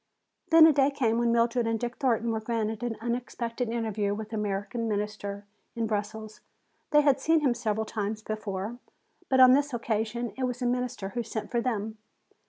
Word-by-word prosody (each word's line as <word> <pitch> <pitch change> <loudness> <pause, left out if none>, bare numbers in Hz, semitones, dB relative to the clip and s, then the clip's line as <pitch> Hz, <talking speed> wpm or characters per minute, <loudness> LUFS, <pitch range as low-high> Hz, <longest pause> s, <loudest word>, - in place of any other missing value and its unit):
Then 325 -1 +9
a 320 - +6
day 275 0 +4
came 235 -5 0
when 235 0 +2
Mildred 235 0 +2
and 225 -1 0
Dick 240 +1 -4
Thornton 235 -4 +1
were 220 - -1
granted 220 -1 -2
an 240 -2 -3
unexpected 235 0 -3
interview 215 -3 -1
with 215 0 -6
the 225 - -5
American 210 +2 -2
Minister 205 -1 -3 0.3
in 230 -1 -1
Brussels. 215 0 -4 0.5
They 295 - +5
had 280 -2 +3
seen 320 +2 +3
him 270 -5 +3
several 220 -2 -1
times 215 0 -3
before, 215 +1 -4 0.5
but 260 - +3
on 255 -1 +9
this 285 -1 +2
occasion 230 +1 -2
it 265 - -1
was 250 -1 -2
the 250 - -3
Minister 245 -5 -1
who 240 +3 -3
sent 220 -1 -5
for 240 -2 +1
them. 220 -3 -3
230 Hz, 190 wpm, -28 LUFS, 215-245 Hz, 0.5 s, Then